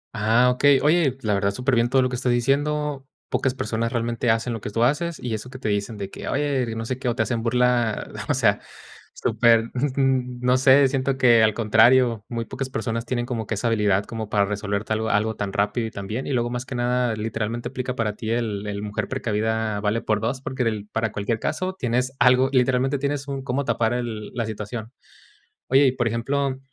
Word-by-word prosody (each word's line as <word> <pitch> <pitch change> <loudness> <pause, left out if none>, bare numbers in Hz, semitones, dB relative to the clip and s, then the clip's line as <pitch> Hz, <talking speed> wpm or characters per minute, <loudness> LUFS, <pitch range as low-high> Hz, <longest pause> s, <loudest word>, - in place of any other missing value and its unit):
Ah, 115 +3 +3
okey. 135 +2 +4
Oye, 155 -3 +3
pues, 130 - -23
la 105 -2 +1
verdad, 100 0 +1
súper 125 +5 -1
bien 120 0 +3
todo 130 +1 +3
lo 125 - +1
que 125 - -3
estás 125 0 0
diciendo. 140 +3 0 0.2
Pocas 130 -1 0
personas 115 -1 -2
realmente 120 0 -1
hacen 115 +2 +1
lo 115 - -5
que - - -5
tú 115 +3 0
haces, 150 +6 +1
y 120 -2 -4
eso 110 +3 -5
que 130 - -9
te 125 - -3
dicen 105 +2 -2
de 100 -1 -6
que: - - -8
"Oye, 140 -3 0
y - - -5
no 115 0 -4
sé 130 +2 -3
qué", 125 - -1
o 120 - -1
te - - +1
hacen 120 -2 -2
burla, 120 -1 +1 0.2
o - - +3
sea, - - +2 0.6
súper, 115 0 +2
mm, 130 -2 0
no 125 +1 +3
sé, 135 +1 +6
siento 135 0 -1
que 120 -3 +5
al 110 -1 +3
contrario, 115 0 +4
muy 115 -1 -3
pocas 130 +2 -5
personas 115 -1 -3
tienen 120 -2 -1
como 115 -4 -4
que 115 - -2
esa 110 +4 -1
habilidad 105 -3 +2
como 110 -2 -6
para 100 -1 +2
resolverte 105 +1 -2
algo 110 +1 -1
algo 110 +2 +1
tan 100 -1 -3
rápido 105 +4 0
y - - -8
tan 100 -2 -7
bien. 110 +6 -4
Y 140 - -2
luego, 120 -1 0
más 125 +1 -4
que 130 - -5
nada, 120 -1 0
literalmente 110 +2 -3
aplica 130 0 -4
para 110 -3 -1
ti 110 +1 -6
el 110 -3 -2
el 100 0 -4
mujer 105 -1 -3
precavida 110 -3 -1
vale 110 +2 0
por 110 -1 +1
2, 125 +4 -2
porque 115 -6 -2
para 110 -1 -1
cualquier 105 +2 -2
caso 185 +9 -2
tienes 125 -5 -1
algo, 125 +2 +5
literalmente 130 +1 +2
tienes 140 0 -2
un 135 -1 -4
cómo 135 +2 -2
tapar 115 -1 +1
la 115 0 -4
situación. 110 +1 -6 0.8
Oye, 135 +2 +5
y 130 - +3
por 120 -2 0
ejemplo, 130 +4 -1
120 Hz, 220 wpm, -23 LUFS, 110-130 Hz, 0.8 s, sé